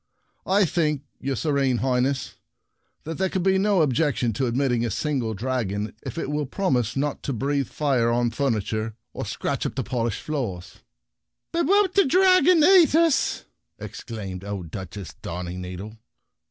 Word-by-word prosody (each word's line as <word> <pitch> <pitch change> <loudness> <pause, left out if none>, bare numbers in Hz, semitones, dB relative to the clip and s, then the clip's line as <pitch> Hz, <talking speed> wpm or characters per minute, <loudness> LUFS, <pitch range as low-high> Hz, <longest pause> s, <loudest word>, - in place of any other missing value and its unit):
" - - -45
I 205 - +5
think, 150 -4 0 0.2
your 135 0 -2
serene 140 -4 +1
High 125 0 +1
ness, 130 -4 -1 0.7
that 165 +2 -6
there 190 0 +1
can 185 -1 -1
be 190 0 +3
no 195 -4 +3
ob 140 -4 +1
jection 125 -4 +1
to 130 +5 0
admitting 120 -1 +1
a 120 - 0
single 125 -2 -1
dragon, 105 -3 -2
if - - -7
it 145 - -3
will 150 -1 -1
promise 125 - 0
not 145 +1 -1
to - - -3
breathe 140 +2 -1
fire 130 -6 +1
on 120 0 +2
the 115 - -13
furniture 110 -4 -1 0.2
or - - -5
scratch - - -2
up - - -7
the - - -1
polished 120 -4 -2
floors." 115 - -4 0.4
" - - -59
But 340 0 0
won't 400 -1 +4
the 395 - +5
dragon 365 +1 +5
eat 345 -3 +6
ns?" 330 -4 +2 0.3
exclaimed 100 -5 -7
old 100 -5 -5
Duchess 95 -2 -7
Darningneedle. 90 +4 -6
130 Hz, 170 wpm, -24 LUFS, 110-160 Hz, 0.7 s, eat